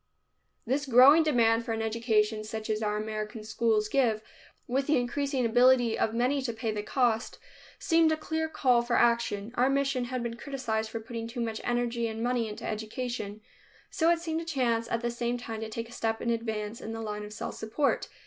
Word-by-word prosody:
This 275 Hz, +4 st, -1 dB
growing 265 Hz, +6 st, +8 dB
demand 235 Hz, -7 st, +3 dB
for 230 Hz, -, -3 dB
an 225 Hz, -, -2 dB
education 220 Hz, -1 st, +1 dB
such 220 Hz, 0 st, -4 dB
as 215 Hz, 0 st, -1 dB
our 210 Hz, -1 st, 0 dB
American 215 Hz, 0 st, -4 dB
schools 215 Hz, 0 st, +1 dB
give, 225 Hz, -3 st, +1 dB, 0.4 s
with 270 Hz, +2 st, -1 dB
the 300 Hz, -1 st, +3 dB
increasing 260 Hz, +1 st, -1 dB
ability 245 Hz, 0 st, +4 dB
of 220 Hz, -, 0 dB
many 250 Hz, +5 st, +1 dB
to 250 Hz, -3 st, -3 dB
pay 225 Hz, 0 st, -2 dB
the 210 Hz, -1 st, -3 dB
cost, 230 Hz, 0 st, 0 dB, 0.4 s
seemed 325 Hz, -1 st, +3 dB
a 315 Hz, -, +1 dB
clear 320 Hz, +1 st, -2 dB
call 250 Hz, -6 st, +3 dB
for 240 Hz, 0 st, -1 dB
action. 235 Hz, -3 st, +2 dB
Our 255 Hz, +1 st, +2 dB
mission 275 Hz, -2 st, +1 dB
had 250 Hz, 0 st, -3 dB
been 235 Hz, -1 st, -4 dB
criticized 230 Hz, -5 st, -3 dB
for 225 Hz, -, -4 dB
putting 230 Hz, 0 st, -6 dB
too 240 Hz, +2 st, -7 dB
much 225 Hz, -2 st, -2 dB
energy 240 Hz, -1 st, 0 dB
and 225 Hz, 0 st, -4 dB
money 240 Hz, -2 st, 0 dB
into 210 Hz, -, -7 dB
education, 215 Hz, -1 st, -4 dB, 0.5 s
so 325 Hz, 0 st, +2 dB
it 340 Hz, -, +4 dB
seemed 330 Hz, -1 st, -3 dB
a -, -, -5 dB
chance 240 Hz, -8 st, 0 dB
at 230 Hz, -, -1 dB
the 240 Hz, 0 st, -1 dB
same 235 Hz, +1 st, -2 dB
time 225 Hz, -2 st, -6 dB
to 220 Hz, -, -4 dB
take 230 Hz, +1 st, -5 dB
a -, -, -15 dB
step 225 Hz, -1 st, -2 dB
in 235 Hz, -, -1 dB
advance 220 Hz, -1 st, -3 dB
in 225 Hz, -, -5 dB
the 225 Hz, -, -5 dB
line 210 Hz, -1 st, -4 dB
of 210 Hz, -, -8 dB
self 210 Hz, -, -5 dB
support. 235 Hz, +6 st, -1 dB
235 Hz, 205 wpm, -29 LUFS, 220-255 Hz, 0.5 s, growing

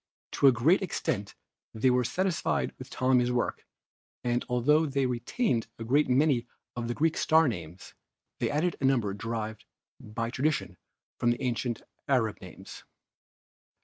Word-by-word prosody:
To 140 Hz, -, +4 dB
a -, -, +9 dB
great 140 Hz, -, +3 dB
extent 110 Hz, -, -2 dB, 0.4 s
they 125 Hz, +4 st, +3 dB
were 125 Hz, 0 st, +3 dB
satisfied 180 Hz, +9 st, 0 dB
with -, -, -9 dB
Ptolemy's 125 Hz, -1 st, +2 dB
work, 125 Hz, -1 st, -2 dB, 0.6 s
and 120 Hz, 0 st, 0 dB
altho 150 Hz, +6 st, +3 dB
they 140 Hz, -1 st, 0 dB
retained 125 Hz, -, -1 dB
a 115 Hz, -, -6 dB
great 140 Hz, +6 st, +2 dB
many 130 Hz, -2 st, +3 dB, 0.3 s
of 120 Hz, -1 st, -3 dB
the 120 Hz, -, -2 dB
Greek 160 Hz, +1 st, +1 dB
star 160 Hz, -1 st, +4 dB
names, 90 Hz, -5 st, -6 dB, 0.5 s
they -, -, 0 dB
added 155 Hz, +4 st, 0 dB
a -, -, +1 dB
number 120 Hz, -7 st, +2 dB
derived 110 Hz, +1 st, -4 dB, 0.3 s
by 115 Hz, +2 st, -4 dB
tradition 145 Hz, +4 st, -1 dB, 0.4 s
from 120 Hz, -, +2 dB
the 120 Hz, +2 st, 0 dB
ancient 120 Hz, -1 st, -2 dB, 0.2 s
Arab 115 Hz, -6 st, +1 dB
names. -, -, -11 dB
125 Hz, 145 wpm, -29 LUFS, 115-145 Hz, 0.6 s, a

